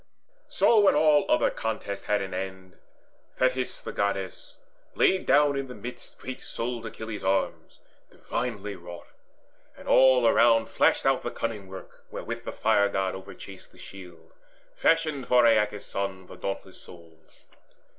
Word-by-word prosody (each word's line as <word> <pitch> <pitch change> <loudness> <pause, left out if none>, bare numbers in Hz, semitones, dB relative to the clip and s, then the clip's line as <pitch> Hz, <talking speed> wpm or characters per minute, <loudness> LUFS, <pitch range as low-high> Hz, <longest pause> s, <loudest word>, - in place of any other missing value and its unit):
So 230 - +4
when 205 -5 +5
all 150 -1 +4
other - - +3
contests 110 -3 -4
had 105 -1 +1
an 95 -1 -7
end, 95 0 -7 0.6
Thetis 130 0 -1
the - - -5
Goddess 100 -2 -3 0.4
laid 190 0 +2
down 145 +1 +4
in 135 -1 -3
the 125 - -9
midst 125 +1 -9
Great 130 0 -8
souled 115 -1 -5
Achilles' 110 -2 -7
arms 95 +1 -2 0.3
divinely 105 -4 -4
wrought; 85 -1 -10 0.7
And - - -13
all 130 -2 +5
around 115 -1 +4
flashed - - +2
out - - +3
the - - -3
cunning 110 -4 -4
work 95 -1 -12
Wherewith - - -6
the - - -4
Fire 100 0 +2
god 95 -1 -1
overchased 95 0 -11
the - - -22
shield 90 -4 -13 0.4
Fashioned 155 -5 +1
for 125 -1 +5
Aeacus' 105 -2 +2
son, 95 -1 -4
the - - -12
dauntless 95 -1 -6
souled. 85 -2 -16
105 Hz, 145 wpm, -27 LUFS, 95-125 Hz, 0.7 s, when